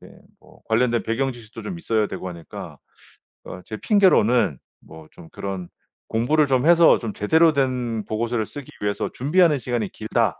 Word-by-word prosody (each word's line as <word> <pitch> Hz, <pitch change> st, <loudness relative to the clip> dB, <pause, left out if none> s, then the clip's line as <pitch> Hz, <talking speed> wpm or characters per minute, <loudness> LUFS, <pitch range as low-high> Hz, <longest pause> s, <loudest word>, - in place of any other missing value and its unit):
이렇게 -, -, -16 dB, 0.2 s
뭐 -, -, -21 dB
관련된 120 Hz, +1 st, +2 dB
배경 130 Hz, +4 st, -1 dB
지식도 115 Hz, -2 st, -12 dB
좀 180 Hz, -3 st, -6 dB
있어야 110 Hz, -9 st, 0 dB
되고 95 Hz, -, -6 dB
하니까 85 Hz, -2 st, -9 dB, 0.7 s
어 90 Hz, -, -9 dB
제 110 Hz, -, -7 dB
핑계로는 125 Hz, -, +3 dB, 0.2 s
뭐 80 Hz, -1 st, -14 dB
좀 80 Hz, -, -15 dB
그런 95 Hz, -3 st, -6 dB, 0.4 s
'공부를 145 Hz, +7 st, +2 dB
좀 130 Hz, 0 st, +1 dB
해서 170 Hz, 0 st, +6 dB
좀 115 Hz, -4 st, -5 dB
제대로 160 Hz, +9 st, +3 dB
된 125 Hz, -5 st, -1 dB
보고서를 115 Hz, 0 st, -2 dB
쓰기 145 Hz, -3 st, -10 dB
위해서 105 Hz, 0 st, -2 dB
준비하는 155 Hz, +3 st, +3 dB
시간이 120 Hz, -4 st, -2 dB
길다.' 110 Hz, -1 st, -1 dB
120 Hz, 345 characters per minute, -22 LUFS, 105-140 Hz, 0.7 s, 해서